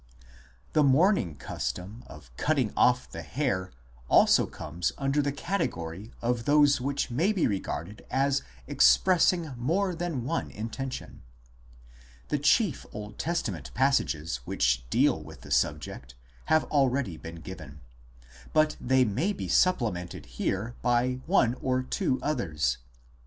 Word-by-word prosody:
The 155 - +4
mourning 140 - +3
custom 100 +11 -5
of 70 -6 -14
cutting 135 - 0
off 125 0 +3
the - - -6
hair 110 -10 -2 0.4
also - - +5
comes 85 +3 -3
under 140 +1 +1
the 140 0 0
category 110 - -3
of 120 -1 0
those 145 -2 +4
which 140 -1 -2
may 165 - +2
be 195 -6 +1
regarded 100 -1 -3
as 135 +1 +1 0.2
expressing 165 - +4
more 175 +11 0
than 165 -7 -3
one 165 +7 -2
intention. 125 +5 -6 1.1
The 150 - 0
chief 155 - +2
Old 105 0 -8
Testa 170 -9 -1
ment 75 -8 -8
passages 85 - +1
which - - 0
deal - - +2
with - - -12
the - - -12
subject 75 -4 -1 0.3
have 155 0 +3
already 135 - +1
been 80 +1 -9
given, 80 -4 -10 0.7
2 - - -18
but 155 0 +3
they 130 0 +3
may 135 - 0
be - - -5
supplemented 110 - +1
here 105 +5 -3
by 125 +1 +1
one 125 -10 +3
or 130 -1 0
two 130 0 -1
others. 85 - -1
125 Hz, 135 wpm, -28 LUFS, 95-150 Hz, 1.1 s, also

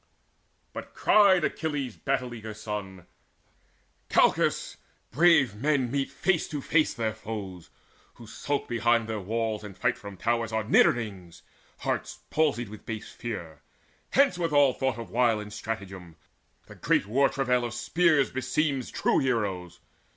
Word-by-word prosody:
But - - -8
cried 195 -5 +5
Achilles' 145 -8 -2
battle 125 -2 -2
eager 110 -2 -7
son: 105 -4 -6 1.0
"Calchas, - - +2 0.3
brave 150 -5 +4
men 130 +2 0
meet 140 -1 -1
face 185 -4 0
to 150 - -4
face 155 +3 +2
their 110 -2 -1
foes! 105 -5 -7 0.5
Who 120 - -13
skulk 140 +5 -3
behind 120 -1 +1
their 110 -1 -3
walls, 110 +2 -2
and 100 -2 -10
fight 120 -1 0
from 100 -2 -9
towers, 115 +1 0
Are 110 0 0
nidderings, 100 -5 +1 0.4
hearts - - -3
palsied 140 -7 +1
with 105 0 -11
base 110 -2 -6
fear. 85 -10 -7 0.5
Hence 270 -10 +3
with 165 -2 0
all 140 -3 +5
thought 130 -3 -1
of 115 - -8
wile 120 -2 +2
and 105 0 -8
stratagem! 95 -7 -6 0.5
The - - -13
great - - +1
war 135 +7 +3
travail 125 -2 0
of 120 - -2
the - - -6
spear 155 +1 +3
beseems 135 +1 -1
True - - +1
heroes. 100 -9 -2
120 Hz, 145 wpm, -27 LUFS, 105-140 Hz, 1.0 s, cried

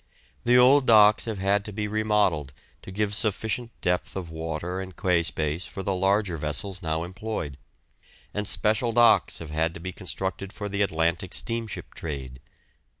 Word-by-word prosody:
The 120 +1 +5
old 130 +2 +6
docks 105 -1 +6
have 110 -3 -3
had 100 +1 +1
to 105 - -5
be 105 +1 -3
remodelled 105 -10 +1 0.3
to - - -11
give 105 +1 -1
sufficient 110 +3 0
depth 90 0 -1
of 90 -4 -5
water 80 +3 -4
and 95 -1 -9
quay 90 -4 +2
space 80 +1 -1
for 95 - -7
the 100 - 0
larger 95 -1 +1
vessels 75 +6 -4
now 80 0 -1
employed, 95 -5 -5 0.8
and 105 -1 -2
special 110 +4 +2
docks 120 0 +5
have 80 -2 -8
had 80 +2 0
to - - -7
be 90 +2 -5
constructed 95 +1 -4
for 105 -3 -5
the 100 0 -2
Atlantic 85 -1 0
steamship 115 -2 -4
trade. 65 -5 -6
95 Hz, 165 wpm, -26 LUFS, 85-105 Hz, 0.8 s, old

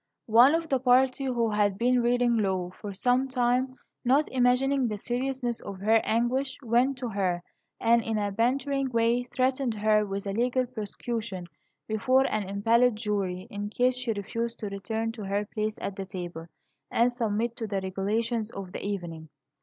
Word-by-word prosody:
One 240 +7 +6
of 330 0 -1
the 270 -3 +1
party, 255 +1 +3
who 235 -4 0
had 205 -2 +1
been 245 +2 +3
reading 240 0 +2
law 190 -4 0
for 205 +2 -8
some 250 +7 +1
time, 255 0 +1 0.3
not 270 +5 +3
imagining 260 +1 +2
the 210 -2 -3
seriousness 245 +1 -2
of 195 - -7
her 220 +3 +4
anguish, 255 +4 0
went 245 +3 +2
to 245 -1 -4
her, 185 -4 -1 0.4
and 235 +1 +4
in 225 -1 -2
a 205 -1 -1
bantering 265 +5 0
way 235 +1 +2
threatened 255 -1 0
her 215 0 +3
with 200 -1 -4
a 200 - -2
legal 250 +3 +1
prosecution 220 -4 -5 0.4
before 255 +5 +3
an 210 -3 -1
impaneled 230 +4 +3
jury 200 -4 -2
in 205 0 -4
case 250 +3 +2
she 250 -2 -2
refused 230 +3 -3
to 210 - -3
return 220 +3 -3
to 225 -2 -8
her 200 +2 -1
place 215 0 -3
at 200 - -4
the 195 -1 -5
table, 175 -3 -6 0.4
and 240 +2 +3
submit 230 -1 -1
to 225 - -3
the 200 -1 -1
regulations 215 +4 -1
of 195 -4 -8
the - - -6
evening. 170 -6 -5
230 Hz, 175 wpm, -27 LUFS, 205-250 Hz, 0.4 s, One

